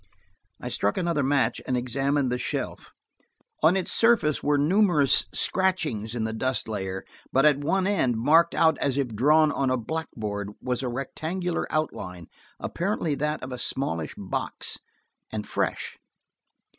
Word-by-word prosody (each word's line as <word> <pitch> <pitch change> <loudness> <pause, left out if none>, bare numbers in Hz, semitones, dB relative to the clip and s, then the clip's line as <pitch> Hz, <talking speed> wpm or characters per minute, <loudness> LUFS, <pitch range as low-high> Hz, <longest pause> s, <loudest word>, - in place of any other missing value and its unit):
I - - -5
struck 100 - 0
another 170 -4 +1
match 140 0 +1
and 125 - +1
examined 135 +2 0
the 125 - -1
shelf. - - -4 0.7
On 165 +5 +5
its 185 - -1
surface 225 -11 +3
were 145 0 +2
numerous 155 -2 +4
scratchings 155 - 0
in 115 - -1
the 110 0 -2
dust 130 0 -1
layer, 95 -3 -4 0.3
but 135 +3 +3
at 145 -2 +5
one 185 +6 +1
end, 160 - +1
marked 160 +8 +4
out 160 -1 +3
as 140 -1 0
if 135 -3 0
drawn 150 +7 +4
on 135 -2 0
a 130 - +2
blackboard, 110 -7 -4
was 125 0 -2
a 130 - -2
rectangular 160 +8 -3
outline, 90 - -3 0.3
apparently 170 -3 -1
that 150 +1 -2
of 130 - -6
a 125 - -5
smallish 85 - -2
box, 95 -2 -3 0.5
and 105 -1 -4
fresh. - - -2
140 Hz, 150 wpm, -26 LUFS, 120-160 Hz, 0.7 s, On